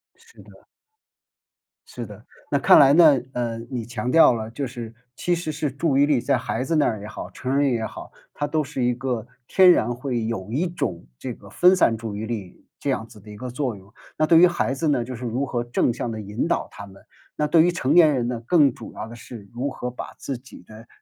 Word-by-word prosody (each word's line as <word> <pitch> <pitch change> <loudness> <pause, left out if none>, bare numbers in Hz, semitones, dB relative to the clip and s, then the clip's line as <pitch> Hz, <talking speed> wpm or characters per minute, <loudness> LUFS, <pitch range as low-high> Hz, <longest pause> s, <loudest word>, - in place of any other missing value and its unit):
是 460 0 -19
的。 - - -17 1.3
是 120 - -7
的。 105 0 -12 0.3
那 140 - +2
看 - - +7
来 140 -1 +7
呢， 155 -3 +7 0.2
呃， 120 -2 -2
你 120 -3 -3
强 120 +1 -3
调 165 -4 +7
了， 110 -1 -5
就 135 +3 -4
是 115 -2 -8 0.2
其 175 - -1
实 165 -2 -4
是 150 -2 -2
注 140 +1 0
意 140 - +5
力 145 -3 +2
在 135 +1 +1
孩 120 +1 -3
子 165 +5 -1
那 155 - +3
儿 110 -3 -1
也 105 - -8
好， 110 - -8
成 130 +2 -2
人 140 -1 +3
也 115 -2 -1
好， - - -9 0.2
它 145 - -2
都 155 +1 0
是 135 -2 -4
一 125 0 +2
个 125 -3 -3 0.2
天 185 -1 +6
然 120 -7 +1
会 120 -2 -3
有 110 -3 -4
一 155 +9 0
种 95 - -4
这 125 - -5
个 100 -3 -15
分 180 - +5
散 115 - +3
注 110 -2 -6
意 110 - -4
力 105 -6 -7
这 - - -4
样 110 +3 -1
子 105 -2 -16
的 105 +1 -13
一 105 - -10
个 125 +3 -6
作 125 -2 -2
用。 95 +1 -18 0.3
那 155 - +3
对 165 - +6
于 180 - +8
孩 175 -6 -1
子 155 +3 -1
呢， 135 -5 +1
就 130 +1 -6
是 120 - -9
如 125 +4 -1
何 120 -3 -2
正 120 0 0
向 115 - -4
地 110 - -5
引 105 0 -3
导 - - 0
他 100 - -9
们， 100 0 -16 0.4
那 150 - +1
对 160 +2 +5
于 175 - +3
成 145 -6 0
年 160 -4 +6
人 120 -3 -1
呢， 120 -2 -3
更 145 -4 +4
主 115 - -10
要 110 - -6
的 115 - -10
是 115 -3 -11
如 125 +4 -2
何 125 -2 -5
把 125 - -8
自 135 - -4
己 130 +2 -14
的 110 +4 -14
125 Hz, 265 characters per minute, -23 LUFS, 115-145 Hz, 1.3 s, 于